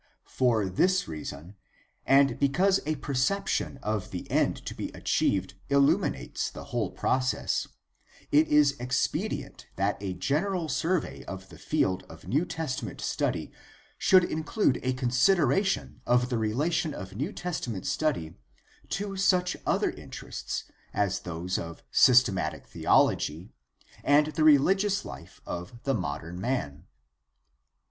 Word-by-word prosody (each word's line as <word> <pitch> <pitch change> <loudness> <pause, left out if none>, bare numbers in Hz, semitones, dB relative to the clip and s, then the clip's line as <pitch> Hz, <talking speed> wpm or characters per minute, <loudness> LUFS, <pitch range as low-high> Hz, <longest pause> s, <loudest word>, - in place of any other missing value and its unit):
For 120 -5 +1
this 180 - +2
reason, 80 +3 -7 0.5
and 135 -2 +4
because 180 +8 +3
a 155 - +1
perception 140 +4 -1
of 105 -3 -2
the - - -6
end - - +2
to - - -4
be - - -5
achieved 95 -1 0 0.2
illuminates 140 - +1
the - - -9
whole - - 0
process, 130 0 0 0.6
it 155 +2 +5
is 150 -1 +5
expedient 125 +1 -2
that 100 +1 -1
a 95 -2 -3
general 160 - -1
survey 170 +1 -1
of 95 0 -8
the - - -13
field 95 0 0
of 80 0 -13
New 150 +7 +1
Testament 130 - -4
study - - -2 0.5
should 185 -1 +6
include 160 - 0
a 130 0 0
consideration 140 +8 +2
of 125 0 +3
the 120 - 0
relation 145 +8 0
of 95 -1 -8
New 145 - -2
Testament 145 - -4
study 130 - -1 0.6
to 195 +1 -3
such 185 -2 +2
other - - +2
interests - - -6 0.3
as 100 -1 +1
those 90 0 -3
of 85 0 -8
systematic 95 - +4
theology 80 +7 +1 0.5
and 145 +1 +5
the 160 - -2
rehgious 190 +7 +4
life - - -10
of 90 +7 -6
the 135 - +1
modern 85 - -4
man. 85 - -2
130 Hz, 125 wpm, -28 LUFS, 95-160 Hz, 0.6 s, should